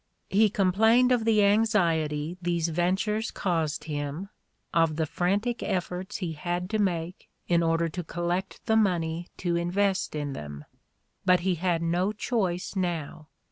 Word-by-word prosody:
He 210 +2 +5
complained 220 +6 +4
of 240 -3 +2
the 215 -2 +4
anxiety 170 -7 +2
these 170 -1 0
ventures 190 +6 0
caused 165 -5 -1
him, 150 +4 -4 0.4
of 165 -2 +3
the 160 0 0
frantic 200 +9 -1
efforts 185 +2 -3
he 180 -5 -3
had 175 +4 -3
to 215 - 0
make 175 -3 -2 0.2
in 170 -1 +3
order 165 0 +2
to 180 +2 -5
collect 175 +3 -3
the 220 - +2
money 175 -5 +1
to 175 -2 -1
invest 185 +2 0
in 145 -2 -3
them. 75 - -8 0.6
But 180 -1 +4
he 185 +1 +1
had 175 -1 0
no 175 +5 +1
choice 200 -4 -2
now. 165 -4 -3
175 Hz, 145 wpm, -27 LUFS, 165-200 Hz, 0.6 s, He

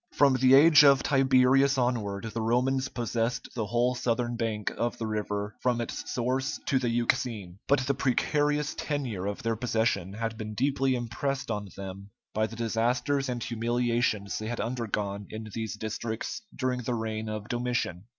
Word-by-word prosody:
From 140 -2 +5
the 130 +1 +6
age 150 +1 +8
of 140 -2 +6
Tiberius 135 0 +4
onward, 115 -4 -1
the 115 - -2
Romans 130 +4 +1
possessed 120 0 -2
the 110 -3 -2
whole 120 +3 +2
southern 120 -1 -1
bank 110 -3 -2
of 120 0 -1
the 115 - -3
river 105 -1 -3
from 125 -2 +1
its 120 - -4
source 130 +2 -1
to 135 - +2
the 125 -2 0
Euxine. 115 -5 -1
But 140 -1 +4
the 135 +1 +1
precarious 145 +3 +1
tenure 125 -11 -3
of 100 - -4
their 115 0 0
possession, 110 -5 0
had 115 +1 -4
been 110 -1 -5
deeply 135 +1 +1
impressed 125 +3 -2
on 105 -2 -3
them 100 +1 -7 0.2
by 110 0 +1
the 115 - -9
disasters 125 +4 0
and 120 -2 -2
humiliations 120 -3 0
they 110 - -5
had 120 +1 -3
undergone 105 -4 -3
in 110 0 -7
these 110 -1 -3
districts 110 - -4
during 125 -1 -1
the 120 +1 -2
reign 110 -1 -3
of 105 -1 -5
Domitian. 120 -7 -2
120 Hz, 170 wpm, -28 LUFS, 110-130 Hz, 0.2 s, age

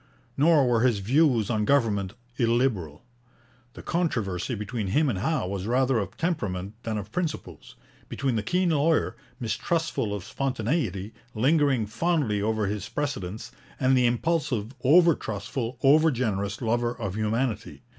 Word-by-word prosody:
Nor 150 -2 +4
were 120 -2 +3
his 120 -3 +3
views 120 +1 +2
on 110 -2 +1
government 105 -6 +1 0.2
illiberal. 115 - 0 0.7
The - - -11
controversy 120 - -1
between 105 0 -4
him 145 +10 +2
and 100 -7 -2
Howe 155 - 0
was 95 +1 -4
rather 130 0 +2
of 95 -2 -5
temperament 100 - -2
than 110 -2 -3
of 105 0 -6
principles, 165 +2 -5 0.3
between 135 -4 -1
the 110 - 0
keen 180 - +1
lawyer, 155 +1 +2 0.2
mistrustful 120 +1 -1
of 100 - -6
spontaneity, 115 - -2 0.2
lingering 135 -1 +3
fondly 115 -2 0
over 110 0 0
his 105 +1 -3
precedents, 115 -7 -4 0.3
and 130 0 +3
the 125 -1 +4
impulsive, 125 -3 -1
over 170 +5 +6
trustful, 115 +2 -4
over 155 +4 +6
generous 105 -5 -2
lover 120 +1 0
of 105 -5 -3
humanity. 110 +3 -2
120 Hz, 140 wpm, -26 LUFS, 105-140 Hz, 0.7 s, over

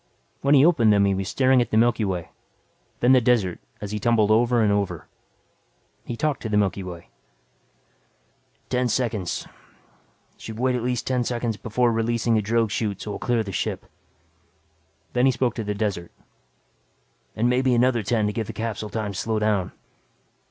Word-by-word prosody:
When 140 +1 +4
he 140 +1 +6
opened 120 -11 +4
them 100 -1 +4
he 100 - +2
was 95 -1 -3
staring 130 +2 +3
at 120 - -2
the 110 - +1
Milky 115 0 +3
Way, 90 -4 -3 0.7
then 120 - +4
the 130 -1 +6
desert 115 -7 +1 0.2
as 105 -1 -5
he 105 - -3
tumbled 110 -1 +2
over 120 +1 +3
and 105 - +3
over. 100 -1 -2 1.0
He 120 - -5
talked 150 0 -1
to 110 - -4
the 105 - +1
Milky 100 -1 +1
Way. 90 -2 -9 1.6
"Ten 125 0 +1
seconds. 110 -6 -2 0.9
Should 110 -1 -8
wait 130 +2 +1
at 125 - -2
least 125 0 -2
ten 125 -2 0
seconds 120 -2 -2
before 120 +3 0
releasing 115 +1 0
the 110 - +3
drogue 115 +1 0
chute 105 -2 -2
so 105 - -5
I'll - - -6
clear 120 -2 0
the 100 - -7
ship." - - -3 1.3
Then 125 +1 +3
he - - +5
spoke 125 0 0
to 115 - -4
the 105 0 -3
desert. 100 -5 -3 1.2
"And 115 +3 +1
maybe 125 0 +2
another 120 -1 +2
ten 110 +1 0
to 105 - -1
give 110 -1 -3
the - - -6
capsule 110 -2 -4
time 105 0 -3
to - - -7
slow 110 -1 -1
down." 105 -4 0
115 Hz, 180 wpm, -24 LUFS, 105-120 Hz, 1.6 s, he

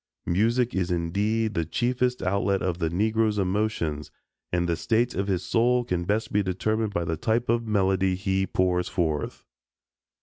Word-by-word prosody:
Music 115 +7 +1
is 95 -1 0
indeed 100 +6 0
the 85 - 0
chiefest 125 - 0
outlet 100 +1 +1
of 90 -2 -1
the 80 -2 0
Negro's 110 +4 +1
emotions, 95 -6 -1 0.4
and 85 0 +1
the 85 - +1
state 115 +8 +1
of 100 +1 -2
his 95 -2 0
soul 120 +1 +2
can 90 -6 -2
best 105 +4 -1
be 105 - +3
determined 105 +3 -1
by 85 -4 -1
the 80 -1 -2
type 115 +8 0
of 115 0 +1
melody 95 -2 +2
he 95 0 0
pours 90 -1 +1
forth. 80 -5 -2
100 Hz, 165 wpm, -26 LUFS, 90-110 Hz, 0.4 s, be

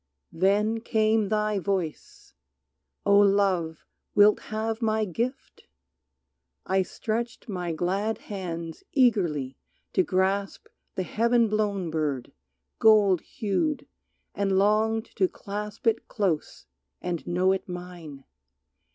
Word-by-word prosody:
Then 205 +6 +2
came 220 -2 +1
thy 210 -1 +1
voice: 185 -5 -4 0.7
"O 200 0 +6
Love, 195 -5 +2 0.3
wilt 205 0 +6
have 220 +1 -2
my 220 -1 +1
gift?" 235 - -4 1.0
I 190 0 +2
stretched 230 +5 -4
my 180 -5 -3
glad 195 +7 -1
hands 170 - -6
eagerly 175 - +2 0.3
to - - +4
grasp 190 +2 0 0.3
The 185 - -1
heaven 235 +3 +2
blown 205 -5 -1
bird, 145 -6 -2 0.5
gold 205 -5 +5
hued, 290 - -2 0.5
and 195 -1 +1
longed 215 +3 +2
to 190 -3 +4
clasp 210 +6 -7
It 225 -1 +1
close 190 -8 -2 0.3
and 175 -2 -4
know 180 +2 +2
it 190 -1 -2
mine. 175 -6 -8
200 Hz, 110 wpm, -26 LUFS, 180-220 Hz, 1.0 s, O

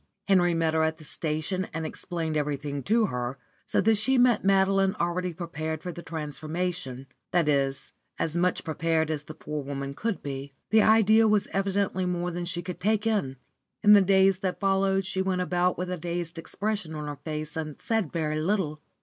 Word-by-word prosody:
Henry 175 -3 +4
met 165 -1 +1
her 160 - +2
at 160 0 +1
the 155 - -13
station 155 +5 -2
and 165 -1 -2
explained 165 -2 -3
everything 145 -1 -2
to 220 - +3
her, 125 -5 -3 0.3
so - - +1
that 220 +2 +4
she 260 +5 +2
met 245 -3 +4
Madeline 195 0 +3
already 180 0 -1
prepared 160 -2 -5
for 180 - -4
the 170 - -8
transformation, 155 -3 -4 0.2
that 175 -3 +2
is, 135 -2 0 0.2
as 160 0 -1
much 180 +1 +1
prepared 160 0 0
as 150 -1 -3
the 155 - -9
poor 150 -1 -5
woman 140 0 -5
could 220 +7 -3
be. 140 0 -5 0.2
The 220 0 +6
idea 220 +1 +5
was 210 -1 +2
evidently 195 -1 0
more 175 0 -1
than 175 0 -4
she 175 0 -1
could 175 +1 -6
take 215 +3 +1
in. 200 -13 0 0.5
In 210 - +8
the 205 - +8
days 190 0 +4
that 190 -2 -2
followed 195 -1 +2
she 190 0 -1
went 190 -1 0
about 180 +1 +1
with 180 0 -3
a 180 - -2
dazed 170 0 -4
expression 200 -2 -3
on 150 -1 -4
her 145 -1 -5
face, 155 0 -4
and 155 -2 -5
said 225 -9 -1
very 155 -2 -1
little. 160 -4 -1
175 Hz, 190 wpm, -27 LUFS, 155-195 Hz, 0.5 s, In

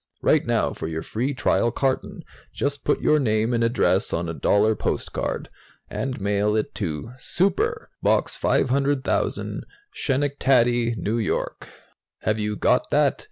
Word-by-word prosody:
"Write - - +3
now - - +1
for - - -5
your 80 0 -4
free 125 +6 -2
trial 120 -3 +1
carton. 130 +2 -2 0.3
Just 140 0 -2
put 145 - +1
your 150 - +4
name 110 -2 +1
and 115 -1 +1
address 115 -5 +2
on 85 +1 -1
a 85 - -3
dollar 105 +6 +2
postcard, - - -3 0.4
and 130 -1 -3
mail 100 +1 +1
it 110 - -1
to 95 0 -4
'Super,' 435 - 0
Box - - +2
500,000, 135 +1 0 0.3
Schenectady, 130 -4 +2
N. 95 -6 -6
Y. 110 - 0 0.8
Have 110 0 0
you 105 0 -1
got - - +2
that? - - +2
115 Hz, 140 wpm, -24 LUFS, 105-135 Hz, 0.8 s, your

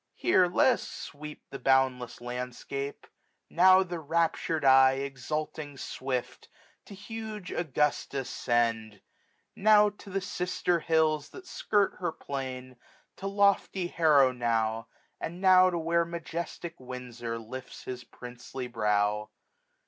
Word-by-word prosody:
Here 185 - +3
let 215 +8 +4
us - - -6
sweep 150 +1 -9
The 135 - -6
boundless 130 -2 +2
landskip: 125 +3 -5 0.5
now 185 +2 +6
the 175 -2 -5
raptur'd 160 0 0
eye. 130 0 +7
Exulting 145 +2 -4
swift, 130 -1 -4 0.4
to 200 - -11
huge 215 -1 -7
Augusta 150 -3 -1
send; 115 -4 -1 0.5
Now 210 0 +5
to 205 -1 -14
the 195 +1 -1
Sifter 180 -2 -1
Hills 155 -2 +1
that 375 - -12
skirt 205 - 0
her 175 -2 -1
plain} 130 -4 -6 0.4
1410 - - -52
To 195 - -5
lofty 200 -2 +2
Harrow 150 -6 +4
now, 115 -2 -1 0.3
and 170 +2 -5
now 185 -1 +6
to 175 - -2
where 170 +1 +1
Majestic 170 0 -6
Windfor 125 -2 -6
lifts 120 +3 -9
his 125 -1 -6
princely 125 +1 -8
brow. 105 -2 0
145 Hz, 125 wpm, -29 LUFS, 125-175 Hz, 0.5 s, eye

